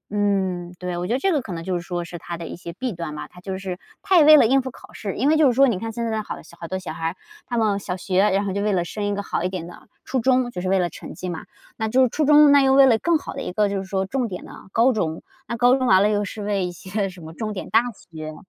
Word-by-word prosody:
嗯， 190 -4 0
对， 180 -1 -4
我 180 +1 -3
觉 230 - 0
得 255 - +2
这 380 +7 +1
个 295 - +1
可 220 - -9
能 165 - -5
就 185 +1 -3
是 175 - -1
说 175 -1 -4
是 170 0 -8
它 170 +1 -6
的 165 - -7
一 - - -7
些 170 0 -8
弊 250 +2 -3
端 165 -3 -6
吧。 - - -6
它 180 - -16
就 190 0 -4
是 190 -2 -5 0.2
它 385 -2 +2
也 310 - +7
为 305 0 +9
了 - - +6
应 270 +4 +4
付 260 - -5
考 - - -15
试， 200 -3 -5
因 275 - +1
为 315 - +4
就 310 - +5
是 250 - +3
说 275 +2 +5
你 200 -6 0
看 225 0 -4
现 235 +1 -3
在 230 - -2
的 220 0 -1
好 - - -6 0.2
好 170 - -6
多 190 - -3
小 185 - -6
孩 165 - -5
儿， 170 - -3 0.3
他 240 - -2
们 210 -3 +2
小 185 -2 -4
学， 185 0 -1
然 200 0 +3
后 190 - -2
就 200 - -1
为 210 +1 +1
了 175 -2 +1
升 205 +4 -4
一 205 0 -1
个 205 - -3
好 170 - -2
一 180 - 0
点 185 -3 -5
的 175 - -13 0.2
初 260 - -1
中， 250 0 +2
就 180 - -5
是 185 - -2
为 195 - +3
了 180 -2 +1
成 - - -10
绩 180 - -5
嘛， 175 - -6 0.3
那 220 -1 -1
就 260 +4 +4
是 255 - +3
初 305 - 0
中 295 0 +7
那 285 - +7
又 265 0 +4
为 275 0 +8
了 235 -4 +4
更 335 +4 +2
好 - - -8
的 270 - -5
一 - - -4
个 210 +1 +2
就 200 - -2
是 190 - -4
说 190 0 -1
重 255 +4 -1
点 180 -4 -7
的 - - -12 0.2
高 240 +4 +4
中， 165 -6 -2 0.2
那 235 - -3
高 245 +2 +5
中 255 -2 0
完 190 +1 +6
了 210 - +3
又 205 -1 +1
是 205 +1 -6
为 200 -3 0
一 - - -5
些 195 +3 -3
什 180 -1 -13
么 160 0 -9
重 215 +5 -4
点 190 - -7
大 225 +3 +6
学。 155 -6 -9
200 Hz, 355 characters per minute, -23 LUFS, 180-245 Hz, 0.3 s, 为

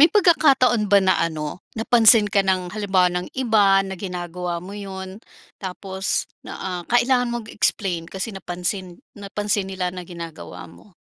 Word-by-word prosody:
May 315 - +8
pagkakataon 275 - +4
ba 200 - +7
na 185 - +4
ano, 155 0 -3 0.2
napansin 225 -1 +6
ka 200 - +5
ng, 190 -1 +1
halimbawa 190 -4 +2
ng 180 0 -3 0.2
iba, 220 -4 +4 0.2
na 190 - -6
ginagawa 180 -1 -5
mo 195 - -8
yun, 190 -1 -7 0.5
tapos 190 +1 -3 0.2
na, - - -8 0.2
ah, 180 -1 -4
kailangan 245 0 +3
mong 240 -1 -4
mag-explain 185 -7 -1
kasi 190 +4 -3
napansin 185 0 -3 0.4
napansin 205 0 -2
nila 185 -1 -3
na 180 0 -7
ginagawa 170 -2 -8
mo? 200 - -20
195 Hz, 150 wpm, -22 LUFS, 180-220 Hz, 0.5 s, May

